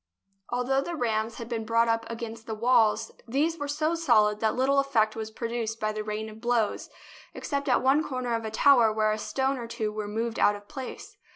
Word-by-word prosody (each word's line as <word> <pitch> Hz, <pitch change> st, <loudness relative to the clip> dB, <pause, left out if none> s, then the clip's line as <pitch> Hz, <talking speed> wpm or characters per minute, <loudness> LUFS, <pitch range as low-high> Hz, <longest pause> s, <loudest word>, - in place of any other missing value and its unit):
Although 250 Hz, +2 st, +1 dB
the 340 Hz, +4 st, -4 dB
rams 225 Hz, -4 st, -1 dB
had 230 Hz, -2 st, -7 dB
been 230 Hz, -2 st, -3 dB
brought 230 Hz, +1 st, +2 dB
up 230 Hz, 0 st, 0 dB
against 230 Hz, -1 st, -7 dB
the 220 Hz, -, -3 dB
walls, 230 Hz, -1 st, +3 dB, 0.2 s
these 305 Hz, +7 st, 0 dB
were 290 Hz, -, -3 dB
so 305 Hz, +3 st, 0 dB
solid 215 Hz, -10 st, +3 dB
that 220 Hz, 0 st, +1 dB
little 275 Hz, +2 st, +3 dB
effect 230 Hz, -6 st, +1 dB
was 220 Hz, -1 st, -4 dB
produced 230 Hz, 0 st, -4 dB
by 215 Hz, 0 st, 0 dB
the 215 Hz, 0 st, -4 dB
rain 215 Hz, +1 st, -4 dB
of 220 Hz, 0 st, -11 dB
blows, 235 Hz, -3 st, 0 dB, 0.5 s
except 280 Hz, -1 st, -3 dB
at 250 Hz, -, +3 dB
one 275 Hz, +4 st, +4 dB
cor 260 Hz, -4 st, -4 dB
ner 240 Hz, -1 st, -1 dB
of 230 Hz, 0 st, -1 dB
a 220 Hz, -, -3 dB
tower 235 Hz, 0 st, +5 dB
where 215 Hz, 0 st, +1 dB
a 215 Hz, -, -2 dB
stone 265 Hz, +4 st, -1 dB
or 235 Hz, -, -6 dB
two 220 Hz, -2 st, -3 dB
were 210 Hz, -1 st, -4 dB
moved 225 Hz, +2 st, -3 dB
out 205 Hz, -, +4 dB
of 205 Hz, 0 st, -12 dB
place. 265 Hz, -3 st, -8 dB
230 Hz, 220 wpm, -27 LUFS, 220-265 Hz, 0.5 s, tower